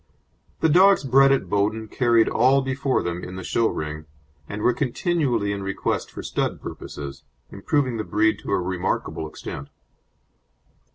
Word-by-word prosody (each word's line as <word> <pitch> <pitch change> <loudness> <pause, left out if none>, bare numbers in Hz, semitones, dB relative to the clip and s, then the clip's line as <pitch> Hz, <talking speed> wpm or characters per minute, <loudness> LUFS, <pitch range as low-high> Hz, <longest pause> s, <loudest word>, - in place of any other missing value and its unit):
The - - +4
dogs 190 +4 +5
bred 135 +1 +5
at 135 -9 +1
Bowden 105 +3 0
carried 115 0 +3
all 130 +3 +3
before 135 0 0
them 85 0 -3
in 90 - -7
the 95 - -6
show 115 +5 +1
ring, 75 -3 -4 0.4
and 105 +1 -5
were 125 - +4
continually 130 - 0
in 100 -1 -3
request 95 0 -2
for - - -8
stud - - -2
purposes, 70 -1 -8 0.3
improving 130 +4 0
the 110 - -2
breed 110 +1 +1
to - - -6
a - - +2
remarkable 90 -3 -2
extent. 70 - -8
110 Hz, 155 wpm, -23 LUFS, 95-135 Hz, 0.4 s, dogs